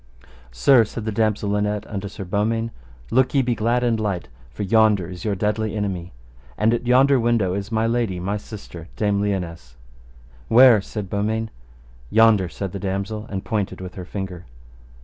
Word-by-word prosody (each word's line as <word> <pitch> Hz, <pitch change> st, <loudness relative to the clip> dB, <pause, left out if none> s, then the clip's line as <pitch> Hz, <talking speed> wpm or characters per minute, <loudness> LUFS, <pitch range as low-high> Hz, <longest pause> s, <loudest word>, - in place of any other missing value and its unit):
Sir, 115 Hz, -, +5 dB
said 110 Hz, 0 st, -6 dB
the 110 Hz, -, -1 dB
damosel 105 Hz, -1 st, 0 dB
Linet 105 Hz, 0 st, -1 dB
unto 100 Hz, -2 st, -5 dB
Sir 95 Hz, 0 st, -8 dB
Beaumains, 115 Hz, +4 st, -1 dB, 0.4 s
look 130 Hz, +3 st, +2 dB
ye 135 Hz, -, +4 dB
be 120 Hz, -1 st, 0 dB
glad 120 Hz, +2 st, +1 dB
and 115 Hz, -2 st, +1 dB
light, 100 Hz, -5 st, -2 dB, 0.2 s
for 65 Hz, -, -6 dB
yonder 105 Hz, -3 st, +3 dB
is 90 Hz, -1 st, -8 dB
your 105 Hz, -2 st, 0 dB
deadly 105 Hz, +2 st, -1 dB
enemy, 95 Hz, -4 st, -3 dB, 0.5 s
and 110 Hz, +2 st, +3 dB
at 120 Hz, +1 st, -2 dB
yonder 135 Hz, +2 st, +5 dB
window 115 Hz, -6 st, +1 dB
is 100 Hz, +3 st, -4 dB
my 110 Hz, 0 st, +1 dB
lady, 115 Hz, -6 st, 0 dB
my 100 Hz, +4 st, -2 dB
sister, 100 Hz, -6 st, -10 dB
Dame 105 Hz, -2 st, +1 dB
Lionesse. 85 Hz, -10 st, -3 dB, 0.7 s
Where? 120 Hz, -2 st, +7 dB
said 105 Hz, 0 st, -6 dB
Beaumains. 110 Hz, +3 st, -2 dB, 0.6 s
Yonder, 110 Hz, -, +4 dB
said 95 Hz, +1 st, -5 dB
the 100 Hz, -, -5 dB
damosel, 100 Hz, +3 st, -3 dB
and 95 Hz, -1 st, -5 dB
pointed 105 Hz, -3 st, -2 dB
with 90 Hz, -1 st, -7 dB
her 90 Hz, -, -7 dB
finger. 95 Hz, -2 st, -6 dB
105 Hz, 170 wpm, -22 LUFS, 95-115 Hz, 0.7 s, Where